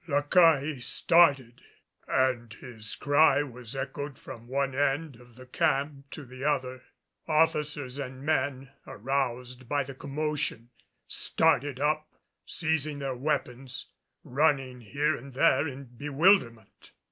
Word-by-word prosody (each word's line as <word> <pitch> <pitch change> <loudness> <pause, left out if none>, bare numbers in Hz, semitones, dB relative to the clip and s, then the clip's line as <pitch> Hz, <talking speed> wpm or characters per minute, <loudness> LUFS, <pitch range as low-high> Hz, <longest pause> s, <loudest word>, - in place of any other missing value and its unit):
La 145 -2 +1
Caille 155 -3 +4
started 140 -3 +3 0.5
and 120 -4 0
his 110 -1 -5
cry 145 0 +4
was 125 -2 -8
echoed 135 0 -5
from 115 0 -11
one 135 +1 -1
end 140 +1 0
of 120 -1 -18
the 130 +1 -13
camp 140 +2 -1
to 150 - -8
the 130 +1 -10
other. 130 -3 -1 0.5
Officers 150 -4 0
and 130 -1 -6
men, 135 -3 -1 0.2
aroused 125 0 -3
by 145 -1 +1
the 135 0 -9
commotion, 140 -4 -3 0.3
started 140 0 +1
up, 155 +1 0 0.4
seizing 160 -3 -1
their 135 -2 -3
weapons, 130 -2 -3 0.3
running 135 -3 +1
here 145 +7 0
and 135 +2 -11
there 135 +2 +3
in 140 0 -7
bewilderment. 140 - +1
135 Hz, 125 wpm, -28 LUFS, 125-150 Hz, 0.5 s, Caille